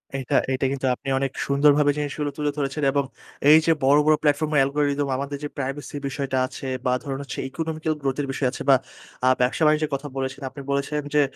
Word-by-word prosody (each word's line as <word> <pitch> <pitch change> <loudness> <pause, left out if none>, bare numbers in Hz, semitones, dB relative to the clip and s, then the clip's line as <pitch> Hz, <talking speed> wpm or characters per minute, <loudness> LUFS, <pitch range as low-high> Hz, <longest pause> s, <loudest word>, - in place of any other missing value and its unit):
এটা, 135 -2 -2 0.2
এটা 130 - 0
কিন্তু 135 -1 -2
আপনি 135 - -14
অনেক 135 -1 -1
সুন্দরভাবে 145 +1 +4
জিনিসগুলো 145 0 -2
তুলে 150 -1 0
ধরেছেন 140 +1 -2
এবং 140 0 +1 0.5
এই 155 - +9
যে, 165 - +4
বড়, 140 +2 +5
বড় 155 0 +5
প্লাটফর্ম 150 +1 +1
এর 145 - +4
অ্যালগরিথম 145 +1 +1
আমাদের 140 +1 -4
যে, 145 - -3
প্রাইভেসি 140 +2 -4
বিষয়টা 135 -1 -2
আছে 135 - -8 0.2
বা 125 - +3
ধরুন 135 -1 -4
হচ্ছে 135 - -6
ইকোনমিক্যাল 160 +1 -2
গ্রোথ 135 0 -1
এর 140 - -3
বিষয় 135 0 0
আছে - - -8
বা 135 - +8 0.7
ব্যবসা-বাণিজ্য 150 +4 +3
যে, - - -8
কথা 140 +2 -6
বলেছেন, 130 +1 -3
আপনি 140 +1 -10
বলেছেন 140 +2 -1
যে, 150 - +5
140 Hz, 200 wpm, -24 LUFS, 135-150 Hz, 0.7 s, এই